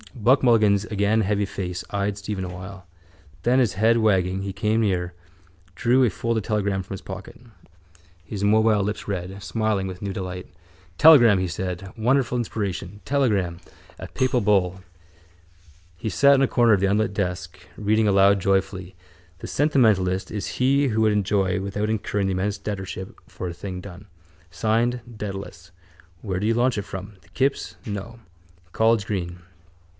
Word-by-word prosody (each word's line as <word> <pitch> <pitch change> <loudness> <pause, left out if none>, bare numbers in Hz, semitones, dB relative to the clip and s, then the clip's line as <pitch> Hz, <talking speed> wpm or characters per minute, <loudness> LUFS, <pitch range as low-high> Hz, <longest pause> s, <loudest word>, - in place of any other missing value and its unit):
Buck 125 +4 +3
Mulligan's 105 -4 +4
again 105 +1 +1
heavy 105 0 0
face 90 -2 -5
eyed 100 0 -2
Stephen 100 -1 -4
awhile. 95 +1 -8 0.6
Then, 125 +4 +3
his 120 -5 +2
head 110 +4 +3
wagging, 95 -4 +1
he 100 0 -4
came 105 +3 0
near, 90 -4 0 0.6
drew 125 +5 +3
a 120 - +4
folded 115 +3 -2
telegram 100 -2 -1
from 95 +2 -7
his 95 - -9
pocket. 100 +5 -9 0.8
His 100 +4 -5
mobile 110 0 +3
lips 105 +2 -4
read, 95 0 -4
smiling 105 -1 -1
with 95 -1 -8
new 100 -1 -3
delight. 90 -1 -5 0.5
—Telegram! 120 -11 +7
he 90 - -1
said. 90 +1 -5
Wonderful 125 +2 +1
inspiration! 105 -4 -4
Telegram! 105 -11 0 0.4
A - - -7
papal 130 -1 0
bull! 95 -3 +1 1.2
He 110 - -3
sat 140 +5 +5
on 135 - +3
a 135 - +4
corner 120 -3 +4
of 100 - +3
the 100 - +3
unlit 105 +1 +1
desk, 90 -2 -3 0.2
reading 110 +1 +2
aloud 100 0 +5
joyfully: 95 -1 -1 0.4
—The - - -7
sentimentalist 110 -11 +2
is 105 -2 -4
he 135 +2 +3
who 110 -1 0
would 110 -1 +3
enjoy 100 -1 +1
without 100 +2 -2
incurring 105 -2 -1
the - - 0
immense 100 +2 -1
debtorship 95 -2 -6
for 90 - -6
a 85 - -5
thing 90 +1 -6
done. 95 0 -11 0.5
Signed: 115 +4 0 0.2
Dedalus. 95 -4 -7 0.5
Where 95 -3 -3
did 105 - -1
you 115 - +2
launch 120 0 +2
it - - 0
from? 95 +2 -8
The 85 - -25
kips? 135 +9 -1
No. 110 +2 -6 0.5
College 110 0 +2
Green. 90 -4 -4
100 Hz, 160 wpm, -23 LUFS, 95-110 Hz, 1.2 s, Telegram